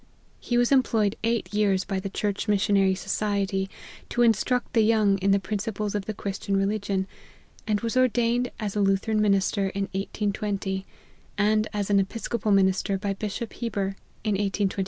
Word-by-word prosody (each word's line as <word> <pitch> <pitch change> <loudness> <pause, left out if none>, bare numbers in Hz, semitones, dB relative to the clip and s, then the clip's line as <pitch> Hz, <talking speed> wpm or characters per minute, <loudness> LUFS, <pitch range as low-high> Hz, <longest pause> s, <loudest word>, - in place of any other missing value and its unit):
He 240 - -1
was 245 +1 +3
employed 225 -6 +3
eight 230 -2 -1
years 200 -3 +2
by 195 - -2
the 195 +1 -4
Church 205 +2 -2
Missionary 200 -2 +3
Society, 195 -1 -1 0.4
to 240 - +2
instruct 240 +2 +1
the 225 - +4
young 215 -3 +3
in 195 +1 +1
the 200 0 +4
principles 210 +1 -3
of 205 -2 -2
the 215 - -3
Christian 195 0 -2
religion, 195 -1 0 0.6
and 210 -1 +1
was 230 +1 -2
ordained 245 -1 +2
as 210 -2 -3
a - - 0
Lu 195 0 +4
theran 215 +2 -1
minister 195 -1 +2
in 200 +1 -2
1820, 195 -1 -2 0.5
and 215 +1 +2
as 205 -1 -2
an 200 - +5
Episcopal 215 +2 -2
min 195 -1 +5
ister 190 +1 -1
by 200 0 -2
Bishop 210 +3 -5
Heber, 200 -5 -2 0.3
in 215 - 0
1825. 200 0 0
205 Hz, 170 wpm, -26 LUFS, 195-220 Hz, 0.6 s, an